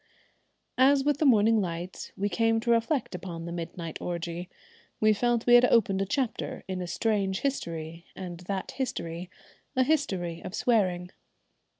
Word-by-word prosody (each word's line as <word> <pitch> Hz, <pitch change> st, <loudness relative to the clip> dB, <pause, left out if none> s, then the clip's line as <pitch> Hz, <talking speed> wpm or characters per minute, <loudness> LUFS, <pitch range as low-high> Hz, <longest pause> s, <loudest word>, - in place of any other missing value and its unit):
As 270 Hz, +1 st, +5 dB
with 290 Hz, 0 st, +1 dB
the 305 Hz, -, +4 dB
morning 220 Hz, -2 st, +5 dB
light 175 Hz, 0 st, -5 dB
we 200 Hz, -, 0 dB
came 225 Hz, +1 st, +2 dB
to 235 Hz, -, +1 dB
reflect 235 Hz, +3 st, +1 dB
upon 175 Hz, -2 st, -6 dB
the 170 Hz, -, -5 dB
midnight 170 Hz, -1 st, -5 dB
orgie, 175 Hz, 0 st, -4 dB, 0.5 s
we 215 Hz, 0 st, +5 dB
felt 240 Hz, +2 st, +1 dB
we 240 Hz, -, +5 dB
had 245 Hz, 0 st, +8 dB
opened 220 Hz, -5 st, +3 dB
a 195 Hz, -, -1 dB
chapter 255 Hz, -1 st, -2 dB
in 185 Hz, -1 st, -3 dB
a 180 Hz, -, -4 dB
strange 195 Hz, -1 st, 0 dB
history, 165 Hz, -, -3 dB
and 175 Hz, -2 st, -7 dB
that 195 Hz, -2 st, -3 dB
history 175 Hz, -9 st, -4 dB, 0.5 s
a 260 Hz, -, +4 dB
history 190 Hz, -, 0 dB
of 185 Hz, -, -6 dB
swearing. 185 Hz, -7 st, +1 dB
195 Hz, 160 wpm, -28 LUFS, 175-240 Hz, 0.5 s, had